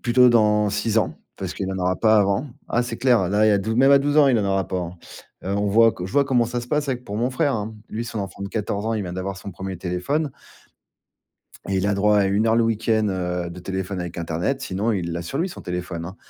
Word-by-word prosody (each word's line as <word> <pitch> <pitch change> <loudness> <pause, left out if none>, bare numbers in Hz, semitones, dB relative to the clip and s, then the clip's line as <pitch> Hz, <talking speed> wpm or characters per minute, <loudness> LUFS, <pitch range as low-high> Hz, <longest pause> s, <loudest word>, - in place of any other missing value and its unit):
plutôt 125 +1 +5
dans 105 -2 +4
6 110 +2 0
ans, 105 - 0 0.2
parce 95 -1 -5
qu'il 95 -1 -3
en 95 - -4
aura 90 0 +1
pas 110 -1 +4
avant. 100 +8 +1 0.2
Ah, 120 - +1
c'est 120 -1 -5
clair, 120 -7 +3
là, 105 +2 +3
il - - +5
y - - +5
a 100 - +3
dou 110 +4 -2
même 135 +2 +5
à 140 - +8
12 145 +2 0
ans, 145 - +7
il 125 - +4
en 100 - 0
aura 95 -1 0
pas, 95 - -2
hein. 85 0 -6 0.5
Heu, 100 +2 -1
on 100 0 0
voit 115 +2 +5
que 90 - -7
je 95 - -9
vois 140 -1 +4
comment 125 -3 +2
ça 120 0 -3
se 120 - -9
passe 150 -1 0
avec 125 -1 -2
pour 105 - -5
mon 120 +3 0
frère, 145 +1 +1
hein. 110 0 -4
Lui, 115 +2 -4
son 110 -1 -5
enfant 100 0 -6
de 100 - -4
14 105 -1 -3
ans, 115 - 0
il 105 - -1
vient 90 -1 -5
d'avoir 95 +1 -4
son 100 0 -8
premier 95 +1 -6
téléphone 110 - -2 1.4
et 95 - 0
il 95 - +1
a 100 - +2
droit 105 +1 +3
à 100 - +3
1 100 +3 +1
heure 115 - +3
le 115 - +4
week-end, 110 -1 +1
heu, 90 -2 -2
de 90 - -9
téléphone 95 +1 -4
avec 90 -1 -6
internet. 85 +11 -2
Sinon, 100 +5 -1
il 85 -4 -2
l'a 85 - -3
sur 135 - -4
lui, 180 +3 0
son - - -9
téléphone, 90 -1 -4
hein. 95 - -9
105 Hz, 280 wpm, -23 LUFS, 95-120 Hz, 1.4 s, à